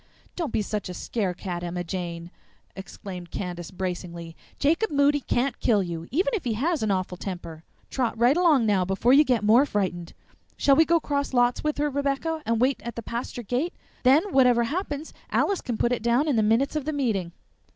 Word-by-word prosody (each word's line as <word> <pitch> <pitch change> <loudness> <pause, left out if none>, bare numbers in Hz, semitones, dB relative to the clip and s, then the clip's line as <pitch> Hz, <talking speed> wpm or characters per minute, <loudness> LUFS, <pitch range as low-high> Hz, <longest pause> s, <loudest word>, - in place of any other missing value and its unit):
"Don't 335 -5 -3
be 215 - 0
such 210 -1 -4
a 180 - -6
scare 195 -4 -2
cat, 175 -2 -5
Emma 175 0 -3
Jane!" 170 -1 -5 0.4
exclaimed 190 -2 -8
Candace 175 -3 -5
bracingly. 175 -3 -5 0.2
"Jacob 330 +10 +2
Moody 285 0 +3
can't 265 0 -1
kill 210 -4 +2
you, 170 -1 -6
even 370 - +1
if 420 - -1
he 240 -4 -1
has 310 +9 0
an 215 - 0
awful 185 -2 -1
temper. 170 -4 -7 0.3
Trot 245 -4 -1
right 240 +5 +4
along 325 -9 +4
now 200 -4 +2
before 195 +7 +2
you 290 +2 +7
get 250 -6 +1
more 225 +6 +6
frightened. 185 -9 -2 0.4
Shall 275 - +4
we 320 - +5
go 335 +1 +3
cross 285 -3 -2
lots 245 0 +2
with 300 0 -1
her, 295 0 0
Rebecca, 285 +3 -1
and 230 0 +1
wait 260 +3 +1
at 235 -1 -6
the 230 - -6
pasture 235 +1 -5
gate? 250 - -2 0.3
Then 270 +5 +5
whatever 250 -3 +5
happens 300 +2 -4 0.2
Alice 395 -2 +1
can 240 -3 -3
put 240 - +1
it 245 - 0
down 240 +6 +2
in 290 - +2
the 220 - +3
minutes 225 +8 +2
of 300 -3 -2
the 310 - -2
meeting." 215 -11 -1
235 Hz, 205 wpm, -25 LUFS, 190-285 Hz, 0.4 s, you